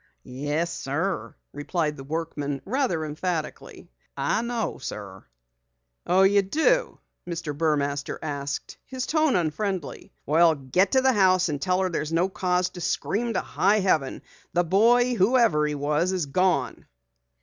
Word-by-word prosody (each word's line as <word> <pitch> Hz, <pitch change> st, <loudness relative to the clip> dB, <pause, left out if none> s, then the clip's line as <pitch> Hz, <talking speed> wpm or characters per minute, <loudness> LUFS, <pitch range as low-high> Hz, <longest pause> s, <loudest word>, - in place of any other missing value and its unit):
"Yes, 145 Hz, +6 st, -2 dB
sir," 160 Hz, +7 st, -3 dB, 0.2 s
replied 150 Hz, +1 st, -2 dB
the 135 Hz, -, -9 dB
workman 145 Hz, -2 st, -4 dB
rather 205 Hz, -, 0 dB
emphatically. 155 Hz, -, -5 dB, 0.3 s
"I 140 Hz, +10 st, 0 dB
know, 235 Hz, -2 st, -3 dB
sir." 100 Hz, -7 st, -8 dB, 0.8 s
"Oh, 185 Hz, +2 st, +4 dB
you 200 Hz, +1 st, +5 dB
do?" 320 Hz, -, +1 dB, 0.3 s
Mr. 165 Hz, -4 st, -4 dB
Burmaster 145 Hz, -2 st, -1 dB
asked, 140 Hz, -2 st, -5 dB
his 260 Hz, -1 st, -5 dB
tone 310 Hz, -3 st, +2 dB
unfriendly. 175 Hz, 0 st, -2 dB
"Well, 160 Hz, +2 st, +4 dB
get 145 Hz, -, 0 dB
to 260 Hz, -, +5 dB
the 260 Hz, 0 st, +3 dB
house 185 Hz, -3 st, +3 dB
and 145 Hz, -2 st, -3 dB
tell 185 Hz, 0 st, +1 dB
her 185 Hz, -, +1 dB
there's 155 Hz, -2 st, -3 dB
no 170 Hz, +3 st, +1 dB
cause 180 Hz, -1 st, 0 dB
to 175 Hz, -, -9 dB
scream 230 Hz, +7 st, -1 dB
to 185 Hz, -, 0 dB
high 205 Hz, +2 st, +1 dB
heaven. 155 Hz, -8 st, 0 dB, 0.3 s
The 175 Hz, -, +3 dB
boy, 235 Hz, +8 st, +4 dB
whoever 215 Hz, -8 st, +3 dB
he 150 Hz, -, -2 dB
was, 150 Hz, +5 st, 0 dB
is 180 Hz, -4 st, -1 dB
gone." 140 Hz, -3 st, 0 dB
175 Hz, 145 wpm, -25 LUFS, 150-195 Hz, 0.8 s, you